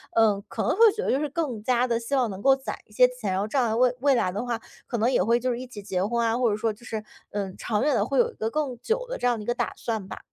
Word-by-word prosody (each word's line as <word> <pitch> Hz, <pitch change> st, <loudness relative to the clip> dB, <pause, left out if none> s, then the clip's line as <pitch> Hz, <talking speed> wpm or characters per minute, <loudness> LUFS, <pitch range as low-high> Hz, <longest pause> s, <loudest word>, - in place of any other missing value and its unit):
呃， 215 Hz, -3 st, +4 dB
可 -, -, -3 dB
能 -, -, +2 dB
会 -, -, -1 dB, 0.2 s
觉 440 Hz, -, -2 dB
得 -, -, +1 dB
就 265 Hz, -, +2 dB
是 300 Hz, -, -1 dB
更 275 Hz, -8 st, -2 dB
加 245 Hz, +1 st, +2 dB
地 230 Hz, -1 st, +1 dB
希 235 Hz, +4 st, -2 dB
望 250 Hz, -4 st, +2 dB
能 190 Hz, -1 st, -7 dB
够 270 Hz, +2 st, +5 dB
攒 265 Hz, -, -5 dB
一 -, -, -27 dB
些 250 Hz, +3 st, +6 dB
钱， 250 Hz, -6 st, -4 dB
然 190 Hz, -, 0 dB
后 205 Hz, -, -1 dB
这 235 Hz, -, -2 dB
样 235 Hz, -3 st, +2 dB
未 250 Hz, 0 st, +4 dB
未 275 Hz, 0 st, +4 dB
来 185 Hz, -6 st, +1 dB
的 205 Hz, +6 st, -3 dB
话， 235 Hz, -2 st, -2 dB, 0.3 s
可 240 Hz, -, -2 dB
能 230 Hz, +4 st, +2 dB
也 245 Hz, -, +3 dB
会 235 Hz, +4 st, +3 dB
就 255 Hz, +1 st, 0 dB
是 240 Hz, -, -3 dB
一 255 Hz, -, -7 dB
起 220 Hz, -5 st, -9 dB
结 190 Hz, -2 st, -1 dB
婚 235 Hz, +1 st, 0 dB
啊， 230 Hz, +1 st, +1 dB
或 245 Hz, -3 st, +2 dB
者 205 Hz, -, +1 dB
说 225 Hz, 0 st, 0 dB
就 230 Hz, +3 st, -17 dB
是， 220 Hz, -3 st, -4 dB, 0.3 s
嗯， 195 Hz, -2 st, -3 dB
长 215 Hz, +1 st, -1 dB
远 295 Hz, -, +2 dB
地 -, -, +2 dB
会 -, -, 0 dB
有 475 Hz, 0 st, +3 dB
一 -, -, -22 dB
个 220 Hz, -, -2 dB
更 275 Hz, -3 st, -2 dB
久 -, -, -1 dB
的 -, -, -3 dB
这 245 Hz, -, 0 dB
样 240 Hz, -2 st, +2 dB
的 210 Hz, -, -6 dB
一 -, -, -10 dB
个 240 Hz, -, +1 dB
打 -, -, -2 dB
算 220 Hz, -5 st, -3 dB
吧。 -, -, -7 dB
235 Hz, 365 characters per minute, -26 LUFS, 215-255 Hz, 0.3 s, 些